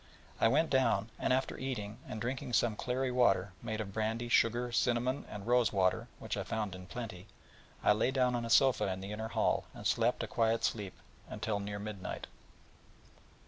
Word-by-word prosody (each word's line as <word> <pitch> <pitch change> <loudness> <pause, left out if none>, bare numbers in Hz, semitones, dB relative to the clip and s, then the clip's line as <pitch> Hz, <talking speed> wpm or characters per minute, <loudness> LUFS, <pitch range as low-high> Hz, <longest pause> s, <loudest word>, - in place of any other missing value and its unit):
I - - +5
went 150 +7 +2
down, 120 -5 +2
and - - +1
after 130 +1 0
eating, 115 -5 -4
and 110 - -5
drinking 125 +1 -3
some 115 -2 +3
clary 125 +3 -1
water, 100 -7 +3
made 110 -2 -3
of 100 -3 -4
brandy, 110 +2 -1
sugar, 120 +1 +3
cinnamon, 120 +3 +1
and 105 -2 -7
rose 120 -2 +3
water, 95 -2 +1
which - - -4
I - - -1
found 110 -4 -2
in 90 0 -9
plenty, 105 -4 -7 0.6
I - - +6
lay 105 +4 +3
down 130 -2 +2
on 120 -1 -1
a 115 - -4
sofa 135 -1 +5
in 95 0 -3
the 100 +1 -6
inner 110 +1 -3
hall, - - +1
and - - -9
slept - - +2
a - - -3
quiet 115 0 +1
sleep 100 -4 -1 0.4
until 105 -1 -2
near 100 0 -4
midnight. 100 -2 -5
110 Hz, 185 wpm, -33 LUFS, 105-125 Hz, 0.6 s, I